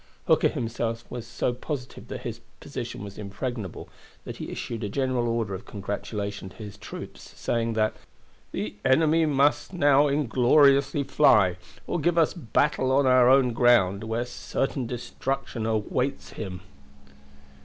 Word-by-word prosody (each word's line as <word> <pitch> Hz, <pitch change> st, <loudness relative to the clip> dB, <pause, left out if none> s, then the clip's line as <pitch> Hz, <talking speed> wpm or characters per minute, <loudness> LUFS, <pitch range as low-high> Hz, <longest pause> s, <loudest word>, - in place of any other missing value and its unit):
Hooker -, -, +4 dB
himself 115 Hz, 0 st, -3 dB
was 120 Hz, -2 st, -6 dB
so 120 Hz, +1 st, -1 dB
positive 125 Hz, 0 st, -6 dB
that -, -, -6 dB
his 120 Hz, -3 st, -5 dB, 0.2 s
position 120 Hz, -6 st, -6 dB
was 100 Hz, 0 st, -9 dB
impregnable 105 Hz, -1 st, -5 dB, 0.4 s
that -, -, -7 dB
he -, -, -6 dB
issued 115 Hz, -2 st, -5 dB
a 105 Hz, -, -2 dB
general 130 Hz, 0 st, 0 dB
order 115 Hz, -4 st, -1 dB
of 95 Hz, -, -7 dB
congratulation 100 Hz, -1 st, -5 dB
to -, -, -18 dB
his 105 Hz, -3 st, -9 dB
troops, -, -, -10 dB
saying 115 Hz, -1 st, 0 dB
that 110 Hz, -1 st, +1 dB, 0.6 s
"the 105 Hz, -, -3 dB
enemy 160 Hz, +4 st, +4 dB
must 145 Hz, +5 st, +2 dB
now 145 Hz, -4 st, +4 dB
ingloriously 140 Hz, +1 st, +4 dB
fly 125 Hz, -10 st, +4 dB, 0.3 s
or -, -, -2 dB
give 170 Hz, +3 st, +1 dB
us 165 Hz, -2 st, +4 dB
battle 140 Hz, -3 st, +1 dB
on 140 Hz, +1 st, +4 dB
our 130 Hz, -1 st, +6 dB
own 130 Hz, -2 st, +5 dB
ground, 115 Hz, -5 st, +4 dB
where 115 Hz, +2 st, -1 dB
certain 125 Hz, +1 st, -3 dB
destruction 125 Hz, 0 st, -3 dB
awaits 120 Hz, +5 st, -1 dB
him." 90 Hz, -4 st, -6 dB
120 Hz, 145 wpm, -26 LUFS, 110-135 Hz, 0.6 s, our